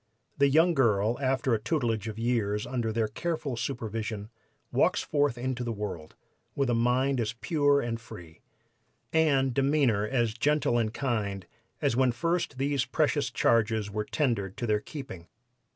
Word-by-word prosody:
The 140 0 +5
young 165 +5 +4
girl, 115 -4 +2
after 130 -1 +1
a 110 - +2
tutelage 115 -3 -1
of 110 -1 -5
years 110 -3 0
under 120 -2 -2
their 110 0 0
careful 155 +3 -3
supervision, 115 -3 -4 0.4
walks - - +2
forth 145 -4 +1
into 125 0 -2
the 120 - -2
world, 95 -8 -6 0.4
with 135 -3 +1
a - - +2
mind 125 +3 +2
as 110 0 -2
pure 145 +3 +2
and 115 -1 -3
free, 85 -7 -12 0.7
and 140 -5 +3
demeanor 135 -6 +2
as 120 -4 0
gentle 140 -1 +1
and 110 -2 0
kind, 105 -8 -2 0.4
as - - +2
when 130 0 +3
first 165 0 -1
these 140 -1 +1
precious - - 0
charges 110 -2 +1
were 105 +1 -2
tendered 115 - -1
to 120 - -2
their 105 -2 +2
keeping. 105 - -8
120 Hz, 155 wpm, -28 LUFS, 110-135 Hz, 0.7 s, The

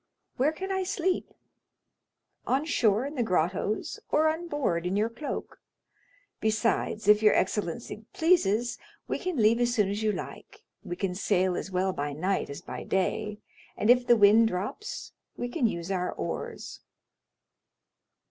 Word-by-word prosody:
"Where 275 +5 +3
can 380 +5 -5
I 380 0 0
sleep?" 370 0 -1 1.2
"On 275 +4 +1
shore 225 -6 +2
in 285 - -5
the 265 - -1
grottos, 195 - -1
or 315 +1 +3
on 325 +2 -3
board 205 - -1
in 185 - -1
your 215 +2 +1
cloak; 290 +5 -6 0.8
besides, 220 -1 0
if 210 0 +6
your 210 -1 +5
excellency 210 +2 -2
pleases, 240 - +2 0.3
we - - -2
can 365 -4 -3
leave 225 +1 +4
as 240 0 +1
soon 210 -4 +2
as 205 +2 -3
you 215 -1 +2
like—we 175 - -8
can 185 0 -2
sail 185 -1 +1
as - - -4
well 190 0 0
by 145 -2 -3
night 185 +7 -1
as 140 - -7
by - - -7
day, 210 +2 -1 0.4
and 215 +3 +4
if 245 0 +3
the 240 - +6
wind 215 +2 +6
drops 210 - -5 0.2
we 245 - -2
can 245 0 +1
use 170 -2 -4
our 180 -1 -1
oars." - - -5
215 Hz, 155 wpm, -28 LUFS, 190-260 Hz, 1.2 s, if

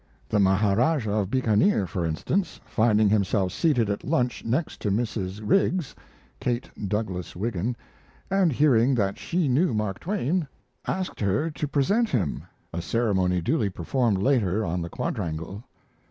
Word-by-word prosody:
The 105 - +2
Maharajah 105 - +2
of 105 -3 0
Bikanir, 115 - +2
for 90 -2 -2
instance, 170 - -1
finding 110 -1 +3
himself 100 -2 +1
seated 140 -10 +2
at 100 0 -2
lunch 125 -5 0
next 130 +8 -2
to 105 - 0
Mrs. 105 -2 -2
Riggs 185 - +2 0.5
(Kate 120 0 -1 0.2
Douglas 95 -3 -3
Wiggin), 110 +3 -2 0.6
and 190 -4 +3
hearing 130 -2 +4
that 100 -4 0
she 175 -2 0
knew 135 0 +2
Mark 105 -3 -2
Twain, 180 -3 -1 0.4
asked 185 0 -3
her 105 +11 0
to 150 0 -3
present 200 - +2
him 95 - -1 0.3
a 85 - -2
ceremony 95 -5 +1
duly 110 - +1
performed 105 +4 0
later 110 -3 +1
on 90 +1 -2
the 85 - -4
quadrangle. 85 +7 -4
110 Hz, 140 wpm, -26 LUFS, 95-140 Hz, 0.6 s, hearing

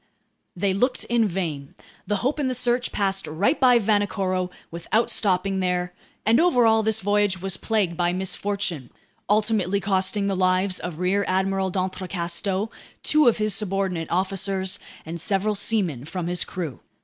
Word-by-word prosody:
They 190 +1 0
looked 250 +6 0
in 235 -2 +2
vain. 165 -7 -4 0.3
The 210 - +1
Hope 290 +3 0
and 275 -3 0
the 255 - -1
Search 245 0 0
passed 195 -1 -1
right 180 - +1
by 250 -2 +6
Vanikoro 195 -4 0 0.2
without 170 +7 0
stopping 195 -1 +2
there; 180 -1 -1 0.3
and 225 +2 +4
overall, 240 -10 +4
this 220 0 +1
voyage 205 -1 +1
was 190 0 -1
plagued 200 -4 0
by 175 0 +1
misfortune, 185 -6 -2 0.4
ultimately 210 -2 +2
costing 195 +1 0
the 200 -1 0
lives 185 0 +1
of 175 -3 -6
Rear 185 +3 +1
Admiral 190 0 0
d'Entrecasteaux, 185 +2 -2 0.3
two 305 -3 +5
of 235 - +4
his 215 -1 +1
subordinate 195 -4 -1
officers, 190 +1 -1 0.3
and 165 +1 -5
several 205 +2 +1
seamen 190 - -1
from 175 +2 -4
his 175 +1 +1
crew. 165 -8 -5
195 Hz, 150 wpm, -24 LUFS, 180-210 Hz, 0.4 s, by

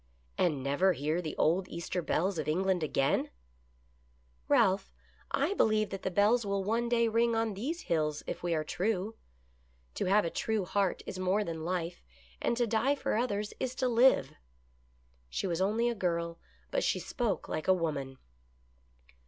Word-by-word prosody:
" - - -37
And 150 -7 +1
never 160 +8 +3
hear 155 +4 -1
the 155 -3 -5
old 180 +4 +2
Easter 170 +1 -3
bells 180 +2 0
of - - -3
England 185 +3 +1
again? 140 -3 +1 0.4
" 60 0 -36
" - - -36
Ralph, 190 +1 +3 0.4
I - - +1
believe 215 - +2
that 195 -1 -5
the - - -1
bells 210 +6 +3
will 200 -1 -1
one 230 +4 0
day 235 -1 +3
ring 230 +1 +2
on 225 -1 0
these 285 - -3
hills 155 -3 -1
if - - -5
we 170 -1 0
are 155 - 0
true. 195 +5 -1 0.8
To - - -2
have 200 +2 +4
a 165 - -2
true 220 -4 -1
heart 195 0 0
is 185 - -6
more 185 +3 +1
than 165 -3 -5
life, 175 0 -3 0.4
and 235 - 0
to 240 - +2
die 230 +5 +2
for - - -1
others 210 -3 -1
is 255 0 -2
to 255 - 0
live." 245 +2 +4 1.0
She 60 - -2
was 175 -1 -1
only 220 +5 +2
a 240 - +1
girl, 170 -4 -2 0.3
but - - +1
she - - +1
spoke 225 - -2
like 155 - -4
a 190 - +6
woman. 140 -6 -3
190 Hz, 180 wpm, -31 LUFS, 165-220 Hz, 1.0 s, a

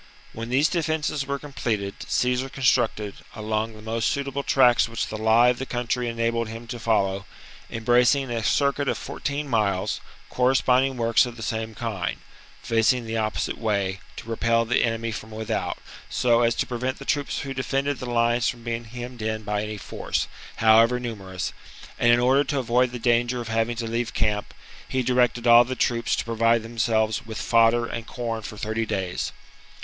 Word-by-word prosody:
When 115 +1 -6
these 135 +5 +3
defences 155 -4 -1
were 140 0 -1
completed, 115 -9 -3
Caesar 125 0 0
constructed, 120 -6 +1 0.2
along 110 +1 -2
the 110 - -12
most 115 +1 0
suitable 140 0 -2
tracts 125 -4 +4
which 115 - -2
the - - -6
lie 110 +3 +4
of 125 - 0
the 130 - -4
country 120 0 -1
enabled 115 0 -1
him 115 +1 -8
to 120 - -5
follow, 100 -4 0 0.4
embracing 120 +3 +2
a 115 -1 -1
circuit 140 +3 +1
of - - 0
fourteen 145 +1 -4
miles, 105 -6 0 0.3
corresponding 130 +1 +2
works 115 +1 +3
of 120 -1 -9
the 115 - -7
same 110 0 -3
kind, 105 -7 -3 0.5
facing 115 +1 +2
the 115 0 -3
opposite 110 -1 -2
way, 100 -4 -1 0.2
to - - -9
repel 115 0 +1
the 120 - +2
enemy 115 0 -1
from 110 0 -7
without, 110 0 -3 0.3
so 120 -1 +3
as 115 -1 +3
to - - 0
prevent 125 +2 -3
the 140 - -10
troops 145 0 -1
who 135 -1 -5
defended 135 +1 -1
the 125 - -5
lines 120 0 +2
from 120 -1 -7
being 115 0 -3
hemmed 120 +1 -8
in 110 0 -2
by 105 0 -1
any 105 0 -5
force, - - -3 0.3
however 115 +2 +5
numerous; 95 -7 -5 0.5
and, 120 - +5
in 120 - +5
order 130 +3 +4
to 145 - -2
avoid 125 0 +2
the 125 - -5
danger 120 +1 +1
of 115 -2 -5
having 115 +1 0
to 115 0 -3
leave 115 +1 -2
camp, 105 -1 0 0.4
he 130 -1 0
directed 125 -1 +2
all 120 0 +8
the 130 +1 -4
troops 115 -2 +1
to - - -3
provide 115 0 +2
themselves 110 -1 0
with 110 -1 -5
fodder 115 0 +3
and 115 -1 -6
corn 115 -2 -4
for 105 0 -8
thirty 110 +2 -2
days. 95 -3 -2
115 Hz, 180 wpm, -25 LUFS, 110-125 Hz, 0.5 s, all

